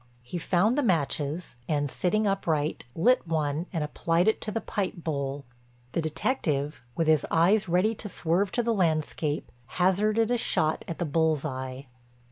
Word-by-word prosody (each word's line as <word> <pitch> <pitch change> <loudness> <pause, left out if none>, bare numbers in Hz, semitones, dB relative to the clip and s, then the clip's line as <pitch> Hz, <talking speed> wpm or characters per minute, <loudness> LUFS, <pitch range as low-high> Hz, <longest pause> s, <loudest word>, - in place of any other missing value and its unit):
He 175 +9 -5
found 195 +8 +2
the 290 - +2
matches 160 - 0
and, 145 -3 0
sitting 215 +4 +1
upright, 160 -8 0
lit 245 +4 +3
one 155 +1 -1
and 165 -4 -1
applied 165 +4 +1
it 220 - +2
to 215 - -3
the 225 - -1
pipe 200 -4 -2
bowl. 140 -4 -3 0.5
The 165 - 0
detective, 155 - -1
with 165 - +1
his 155 -2 +4
eyes 190 +5 +3
ready 185 +6 +3
to 210 -1 -6
swerve 185 +3 0
to 240 - +1
the 230 0 +1
landscape, 155 -5 0 0.3
hazarded 210 +5 +2
a 245 - +2
shot 155 -7 +1
at 165 - -4
the 175 - -1
bull's 160 -1 +1
eye. 130 -1 -5
165 Hz, 165 wpm, -27 LUFS, 150-200 Hz, 0.5 s, his